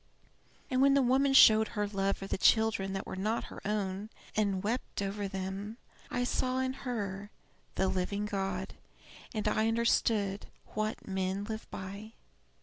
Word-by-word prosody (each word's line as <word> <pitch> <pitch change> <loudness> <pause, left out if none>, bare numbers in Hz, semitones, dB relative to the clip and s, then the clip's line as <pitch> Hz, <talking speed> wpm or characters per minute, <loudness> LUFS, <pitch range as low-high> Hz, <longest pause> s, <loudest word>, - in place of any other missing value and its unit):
And 255 0 +2
when 275 0 +6
the 280 - +5
woman 265 +3 +3
showed 220 -4 +8
her 205 0 +1
love 195 -1 0
for 195 - -7
the - - -2
children 220 -4 +3
that 195 - -3
were - - -5
not 215 +5 -1
her - - -9
own, 200 0 -2 0.3
and 200 -3 +1
wept 235 +5 -2
over 200 0 -2
them, 195 +3 -5 0.3
I 245 - -1
saw 255 +1 0
in 260 0 0
her 205 -7 -4 0.5
the 190 - +2
living 190 +2 -1
God 195 -2 -3 0.6
and 215 -2 -2
understood 220 -2 +1 0.3
What 215 +1 -2
men 190 0 -1
live 220 +1 -6
by. 200 +4 -7
210 Hz, 150 wpm, -31 LUFS, 195-225 Hz, 0.6 s, showed